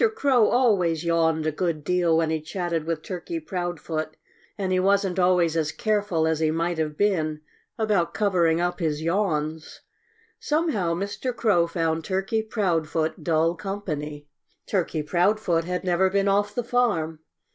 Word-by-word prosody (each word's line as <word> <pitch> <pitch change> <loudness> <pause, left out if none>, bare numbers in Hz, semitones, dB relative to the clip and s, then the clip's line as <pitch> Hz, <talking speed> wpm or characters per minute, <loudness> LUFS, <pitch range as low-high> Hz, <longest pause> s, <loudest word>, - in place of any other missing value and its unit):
Crow 265 - +3
always 185 -10 +2
yawned 160 -2 +2
a 155 - +1
good 160 -1 -2
deal 175 -1 +2
when 165 -1 +1
he 160 -1 -1
chatted 170 0 -3
with 165 -1 -3
Turkey 195 - -5
Proudfoot 175 - -4 0.4
and 190 -2 -2
he 185 - +2
wasn't 195 -1 +2
always 180 -3 +3
as 160 -2 0
careful 205 -7 0
as 160 -1 +1
he 160 -1 +2
might 165 +1 -1
have 150 -1 -2
been 155 -7 0 0.4
about 210 -6 +1
covering 175 -6 +2
up 175 +1 -1
his 155 -3 -1
yawns. 160 -4 -1 0.6
Somehow 295 - 0
Mr. 205 +7 -3
Crow 190 -9 +2
found 165 -1 -1
Turkey 195 +5 -1
Proudfoot 165 -7 -1
dull 165 0 +2
company. 155 -6 -5 0.4
Turkey 170 -5 -1
Proudfoot 175 0 +1
had 180 0 -3
never 185 +1 +2
been 200 +1 +1
off 205 +1 +1
the 245 - -1
farm. 205 -11 0
175 Hz, 150 wpm, -25 LUFS, 160-200 Hz, 0.6 s, Crow